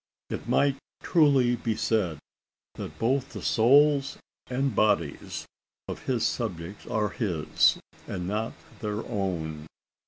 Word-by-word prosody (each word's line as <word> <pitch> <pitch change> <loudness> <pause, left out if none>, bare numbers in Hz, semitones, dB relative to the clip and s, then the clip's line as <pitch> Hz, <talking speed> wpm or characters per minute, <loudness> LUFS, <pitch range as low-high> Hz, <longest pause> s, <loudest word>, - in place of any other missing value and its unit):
It - - -5
might 140 -1 +3 0.3
truly 140 -8 +4
be 115 -1 -1
said, 105 -7 0 0.6
that - - -7
both 130 +3 0
the - - -6
souls 140 +4 +4 0.3
and 130 -2 -1
bodies 85 -9 0 0.4
of - - -5
his 125 -4 +1
subjects 95 -4 -3
are 105 -1 0
his, 90 -10 +2 0.3
and 90 - -4
not 110 +3 -2 0.3
their 105 0 -3
own. 80 -7 -3
110 Hz, 120 wpm, -27 LUFS, 95-130 Hz, 0.6 s, truly